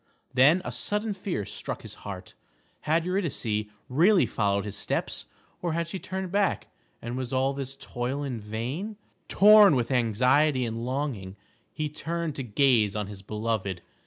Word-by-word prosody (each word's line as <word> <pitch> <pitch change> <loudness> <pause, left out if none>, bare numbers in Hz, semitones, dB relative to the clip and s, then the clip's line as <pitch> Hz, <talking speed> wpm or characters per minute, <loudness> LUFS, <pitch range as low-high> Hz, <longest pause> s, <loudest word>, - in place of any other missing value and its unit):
Then 150 +8 +5
a - - -3
sudden 210 +1 0
fear 185 - -3
struck - - -6
his - - -7
heart. 95 -2 -8 0.6
Had 165 +1 +3
Eurydice 140 - -1 0.2
really 175 +9 +4
followed 100 -1 0
his 105 -1 -4
steps, - - -1 0.4
or 170 -2 -1
had 170 0 -1
she 190 +3 -5
turned 190 -1 -5
back, 200 -1 +1 0.3
and 120 +1 -4
was 130 -1 -4
all 135 +1 +1
his 135 0 -6
toil 130 +2 -3
in 130 -5 -3
vain? 125 - -4 0.3
Tom 210 -4 +7
with 125 0 0
anxiety 125 +4 +3
and 115 0 -4
longing, 125 -8 -3 0.4
he 155 - -2
turned 165 +1 -3
to 135 - -3
gaze 115 -3 +3
on 105 -1 -1
his 100 -1 -9
beloved. 105 -3 -3
130 Hz, 160 wpm, -27 LUFS, 110-170 Hz, 0.6 s, Tom